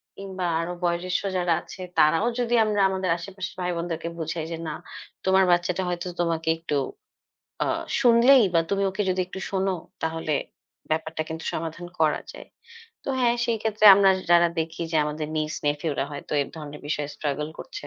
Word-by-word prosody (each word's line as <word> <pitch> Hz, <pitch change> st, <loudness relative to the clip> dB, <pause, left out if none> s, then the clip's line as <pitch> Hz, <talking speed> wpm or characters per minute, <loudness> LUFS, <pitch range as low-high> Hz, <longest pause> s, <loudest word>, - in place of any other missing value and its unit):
কিংবা 190 Hz, -2 st, -5 dB
আরও 170 Hz, +2 st, -2 dB
বয়োজ্যেষ্ঠ 175 Hz, +1 st, 0 dB, 0.2 s
যারা 175 Hz, -1 st, +2 dB
আছে 190 Hz, -, -11 dB, 0.2 s
তারাও 165 Hz, +7 st, +4 dB
যদি 240 Hz, -1 st, 0 dB
আমরা 210 Hz, -1 st, +1 dB
আমাদের 190 Hz, -1 st, -2 dB
আশেপাশের 185 Hz, +2 st, -7 dB
ভাইবোনদেরকে 170 Hz, -2 st, -2 dB
বুঝাই 160 Hz, 0 st, -3 dB
যে, 165 Hz, -, -3 dB
না 155 Hz, -, -3 dB, 0.5 s
তোমার 190 Hz, 0 st, +5 dB
বাচ্চাটা 175 Hz, +1 st, +1 dB
হয়তো 175 Hz, 0 st, -3 dB
তোমাকে 165 Hz, -1 st, 0 dB
একটু 165 Hz, -2 st, -3 dB, 0.9 s
আ -, -, -1 dB, 0.3 s
শুনলেই 245 Hz, +2 st, +7 dB
বা 165 Hz, -, +6 dB
তুমি 200 Hz, 0 st, +1 dB
ওকে 190 Hz, +2 st, -2 dB
যদি 185 Hz, 0 st, 0 dB
একটু 190 Hz, -, -8 dB
শোনো 195 Hz, 0 st, 0 dB, 0.3 s
তাহলে 160 Hz, -1 st, -2 dB, 0.6 s
ব্যাপারটা 160 Hz, 0 st, -1 dB
কিন্তু 160 Hz, 0 st, -6 dB
সমাধান 165 Hz, +2 st, -4 dB
করা 155 Hz, -2 st, +3 dB
যায়। -, -, -11 dB, 0.6 s
তো -, -, -6 dB
হ্যাঁ, 240 Hz, -1 st, +4 dB
সেই 235 Hz, -1 st, +1 dB
ক্ষেত্রে 215 Hz, -1 st, 0 dB
আমরা 195 Hz, 0 st, +5 dB, 0.2 s
যারা 170 Hz, 0 st, +6 dB
দেখি 160 Hz, +1 st, -2 dB
যে, -, -, +2 dB
আমাদের 150 Hz, 0 st, -3 dB
niece, 155 Hz, 0 st, -1 dB
nephew 145 Hz, +2 st, 0 dB
রা -, -, +2 dB
হয়তো 145 Hz, -, -7 dB
এই -, -, +1 dB
ধরনের 150 Hz, -1 st, -8 dB
বিষয়ে 145 Hz, -1 st, -2 dB
struggle 150 Hz, +1 st, -2 dB
করছে। 410 Hz, +10 st, -8 dB
175 Hz, 170 wpm, -25 LUFS, 160-190 Hz, 0.9 s, শুনলেই